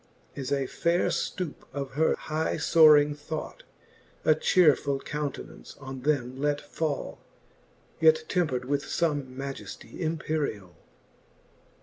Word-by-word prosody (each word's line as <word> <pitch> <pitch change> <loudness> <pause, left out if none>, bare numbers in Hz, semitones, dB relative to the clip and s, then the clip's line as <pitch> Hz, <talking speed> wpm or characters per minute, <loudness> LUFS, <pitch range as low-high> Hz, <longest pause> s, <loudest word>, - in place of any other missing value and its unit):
As 135 -1 -5
a 140 -1 +1
faire 170 +6 +1
ftoupe 180 -6 -3
of 140 -2 -4
her 155 +4 +2
high 155 +1 -2
foaring 150 -2 +6
thought, 150 +1 -6 0.6
A 155 - +6
chearfuU 150 -4 +3
countenance 145 -1 -6
on 135 -1 -7
them 130 -2 -1
let 145 0 +1
fall, 145 0 -4 0.8
Yet 470 -1 +5
tempred 145 -9 0
with 140 +2 0
fome 145 -6 -1
majeftie 135 0 -7
imperiall. 155 - -2
145 Hz, 110 wpm, -27 LUFS, 135-160 Hz, 0.8 s, foaring